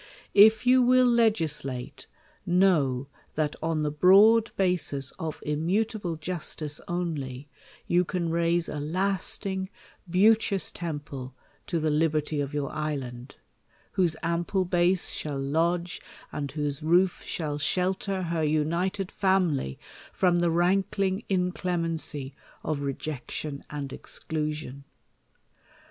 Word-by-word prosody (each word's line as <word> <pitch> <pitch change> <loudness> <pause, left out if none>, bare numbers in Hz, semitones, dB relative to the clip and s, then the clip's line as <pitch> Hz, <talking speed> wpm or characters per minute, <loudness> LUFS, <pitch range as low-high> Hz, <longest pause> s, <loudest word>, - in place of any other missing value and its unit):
If 220 +3 +7
you 255 0 +6
^vill 250 -1 +5
legislate; 155 - -1 0.4
know, 155 -8 +2 0.3
that 150 -1 0
on 160 -1 0
the 150 - 0
broad 205 +8 +6
basis 170 -8 +1
of 160 -2 -4
immutable 175 +4 -1
justice 155 -2 -4
only, 150 -6 -4 0.4
you 175 +1 +3
can 170 -2 -2
rane 170 +1 +2
a 150 - -4
lasting, 190 +3 0 0.4
beauteous 200 +2 +3
temple 145 -6 -6 0.3
to 170 - -1
the 155 0 0
liberty 155 -1 +1
of 140 -1 -3
your 145 -2 -2
island; 135 -5 -5 0.6
whose 175 -5 +2
ample 170 +3 0
base 175 +1 +2
shall 145 -2 -3
lodge, 170 +5 0 0.3
and 140 -2 -4
whose 145 -2 -2
roof 175 +4 +2
shall 150 -3 -3
shelter 185 +5 0
her 170 -1 -1
united 170 +5 0
family 180 - +1 0.3
from 180 -2 +2
the 175 0 +2
rankling 190 +3 +1
inclemency 170 -6 -1 0.3
of 150 -2 -2
rejection 140 +1 -4
and 140 -2 -5
exclusion. 150 -3 -5
165 Hz, 110 wpm, -27 LUFS, 150-185 Hz, 0.6 s, If